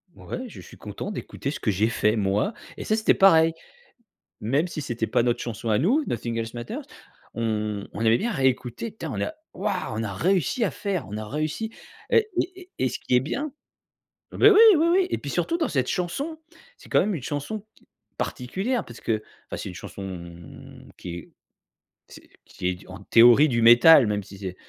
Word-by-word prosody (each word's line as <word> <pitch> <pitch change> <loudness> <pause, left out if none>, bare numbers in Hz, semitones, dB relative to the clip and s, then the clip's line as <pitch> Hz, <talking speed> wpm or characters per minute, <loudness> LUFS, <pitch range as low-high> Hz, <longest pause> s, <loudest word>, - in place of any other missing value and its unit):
Ouais, 255 - -6
je 225 - -11
suis - - -14
content 105 - -6
d'écouter 140 -8 -5
ce - - -6
que 110 - -1
j'ai 105 +4 +1
fait, 105 -1 +1
moi. 105 - 0 0.2
Et - - -5
ça, 215 - +1
c'était 220 0 +3
pareil, 165 -4 +5 0.9
même 140 +11 0
si 155 - -5
c'était 120 -4 -3
pas 115 - +2
notre 120 -1 0
chanson 115 -1 -4
à 105 - +3
nous, 250 - +2
Nothing 115 0 -3
Else 115 0 -4
Matters, 120 0 -5 0.5
on 105 -3 -2
on - - -7
aimait 115 +1 +4
bien 235 - -1
réécouter: 130 - -1
«Putain, - - -5
on - - -3
a 315 - -2 0.2
wouah! 195 -1 -2
On 110 - -1
a 105 -3 -4
réussi 185 - +1
à 200 - +1
faire, 195 -8 -3
on 105 - -5
a 110 0 -5
réussi», 155 - -3 0.4
heu, 460 -2 +6 0.2
et 370 +1 -4
et 365 0 -15
et 130 - +1
ce 125 - -5
qui 125 - +1
est - - +5
bien 275 - -3 0.8
eh - - -6
beh, 425 - +8
oui, 415 0 +7 0.2
oui, 320 +2 +3
oui! 370 +1 +3
Et - - -1
puis, - - -6
surtout, 335 - -1
dans 320 - 0
cette 130 -3 0
chanson, 275 - -3 0.4
c'est - - -16
quand - - +4
même 210 0 0
une 155 - -5
chanson 150 - -4 0.5
particulière 195 - -2
parce 120 - -12
que 110 -2 -1 0.3
enfin, - - -5
c'est - - -5
une - - -10
chanson 85 -4 -9
qui 90 - -7
est 85 - -11 0.8
c'est - - -15 0.2
qui 90 - -5
est 90 - 0
du 90 - -17
en 95 +1 -10
théorie, 120 +7 +7
du 115 -2 +1
métal, 120 +5 +8
même 105 -1 -1
si 100 0 -12
c'est 95 -2 -6
130 Hz, 210 wpm, -25 LUFS, -, 0.9 s, beh